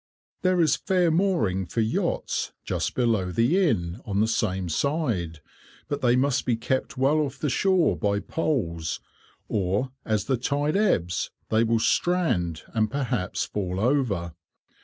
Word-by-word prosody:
There 185 -1 +2
is 155 -4 +3
fair 180 -3 +2
mooring 120 - +1
for 115 +8 -1
yachts 110 +1 -1
just - - -2
below 115 -7 +1
the 130 - +3
Inn, 85 -7 -2
on 100 -1 -2
the 110 - +3
same 95 -4 -1
side, 95 - -1 0.5
but 145 0 -3
they 120 -1 +4
must 135 0 +2
be 120 - +1
kept 130 +4 -2
well 140 +4 +3
off 140 -3 -2
the 150 - -1
shore 180 - +3
by 100 +5 0
poles, 95 - -2 0.5
or 100 +6 0
as 110 -3 0
the 130 - +1
tide 145 +5 0
ebbs 90 - +1 0.2
they 110 +1 +3
will 115 0 +2
strand 110 - +1
and 110 -1 +1
perhaps 125 -8 -1
fall 95 -2 -3
over. 110 - 0
115 Hz, 150 wpm, -26 LUFS, 95-145 Hz, 0.5 s, they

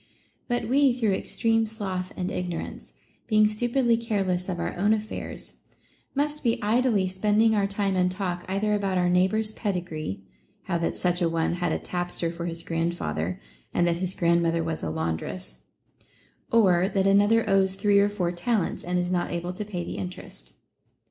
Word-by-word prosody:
* - - -41
But 240 -2 -1
we 270 +1 +4
through 225 -5 +1
extreme 225 +3 +1
sloth 190 -4 -4
and 180 0 -2
ignorance, 180 -2 -5 0.3
being 215 -2 +5
stu 215 +3 -2
pidly 235 -2 +2
careless 195 -5 0
of 175 -2 -2
our - - -2
own 205 +4 +3
affairs, 215 0 -5 0.6
must 295 +2 -1
be 235 -2 +2
idly 215 -2 +2
spending 210 +4 +3
our 200 -2 +2
time 200 -1 -1
and 180 0 +3
talk 180 -1 -3
either 205 +2 +1
about 195 -2 0
our 180 0 +2
neighbor's 190 +5 +2
pedigree, 175 - -3 0.4
how 170 -2 -1
that 165 - -1
such 180 0 +1
a 170 - +3
one 165 0 0
had 175 -1 -1
a - - +1
tapster 175 -1 -3
for 170 0 -4
his 165 0 -3
grandfather, 165 - -2 0.4
and 175 - +3
that 170 -1 +1
his 185 +1 -1
grandmother 170 -1 +2
was 160 -1 -3
a 80 - -2
laundress; 80 -6 -4 0.9
or 190 -5 +4
that 195 -2 +1
another 205 +3 +4
owes 195 -1 +3
three 200 0 +3
or 200 +1 +4
four 185 -4 -1
talents, 180 +2 -1
and 180 +1 -1
is 180 0 0
not 175 -1 0
able 175 +1 -3
to 195 - -4
pay 190 -4 -4
the - - -6
interest. 90 -10 -8
185 Hz, 180 wpm, -26 LUFS, 175-215 Hz, 0.9 s, being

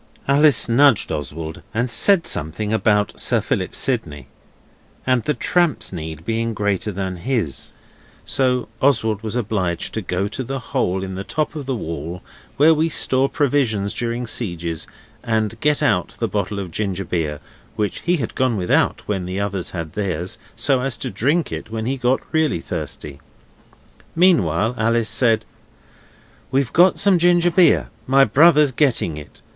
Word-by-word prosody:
Alice 140 -1 +4
nudged 120 0 +4
Oswald 80 +2 -5
and 120 +3 +1
said 170 - +3
something 105 - -1
about 105 -2 +1
Sir - - +1
Philip - - -2
Sidney 75 -3 -2 0.8
and 130 -2 +2
the 150 +4 -1
tramp's 170 - 0
need 80 -1 -7
being 115 0 -1
greater 105 0 -1
than 95 -1 -4
his, 110 - -3 0.5
so 125 -2 0
Oswald 110 -6 +2
was 110 0 -4
obliged 100 -7 -1
to 110 - -2
go 90 +1 -2
to 120 +6 -5
the 135 +2 -4
hole 95 -6 -1
in 95 0 -5
the 95 +1 -5
top 155 +9 -2
of 145 -3 -6
the 135 - -1
wall 85 -3 -6 0.3
where 155 +3 +6
we 160 +1 +1
store 135 -3 +2
provisions 120 -8 0
during 120 +1 -2
sieges 85 -8 -2 0.3
and 110 -1 -1
get 150 0 +2
out 90 -2 +1
the - - 0
bottle 100 0 -2
of 95 -4 -5
ginger 95 -1 -2
beer 80 -4 -2 0.4
which 105 -3 -2
he 175 +1 +1
had 120 -7 -4
gone 130 -4 0
without 90 -2 +1
when 95 -4 -2
the 95 +2 -3
others 100 -3 -2
had 85 -4 -6
theirs 90 -3 -3 0.2
so 135 -3 +2
as 130 -3 -1
to - - -4
drink 145 - 0
it - - -6
when 110 0 -4
he 130 +3 -1
got 125 0 +1
really 155 - +1
thirsty. 75 -3 -6 0.9
Meanwhile 115 - +3
Alice 115 0 +2
said 115 -3 +2 1.0
'We've 135 -2 0
got 180 +2 +5
some 195 -3 +4
ginger 175 0 +4
beer; 175 +1 +4 0.2
my 135 +1 +5
brother's 150 +4 +5
getting 120 - +1
it. 75 - -12
110 Hz, 160 wpm, -20 LUFS, 95-135 Hz, 1.0 s, where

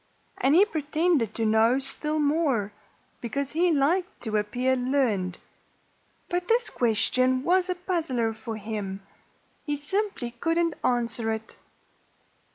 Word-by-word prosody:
And 275 +3 +3
he 385 +4 +7
pretended 310 - 0
to 225 - 0
know 220 +3 +4
still 285 +3 -2
more, 285 -9 +1 0.5
because 270 +4 -3
he 345 +3 +2
liked 325 +5 +1
to 220 -2 -3
appear 245 +5 0
learned. 245 -9 0 0.9
But 355 0 -2
this 465 0 +2
question 255 +3 +2
was 365 +2 +2
a 365 - 0
puzzler 320 -11 -1
for 220 0 -6
him. 205 -2 -5 0.6
He 295 -2 -1
simply 295 - -2
couldn't 330 +7 0
answer 235 -2 0
it. 220 0 -5
260 Hz, 125 wpm, -26 LUFS, 225-330 Hz, 0.9 s, he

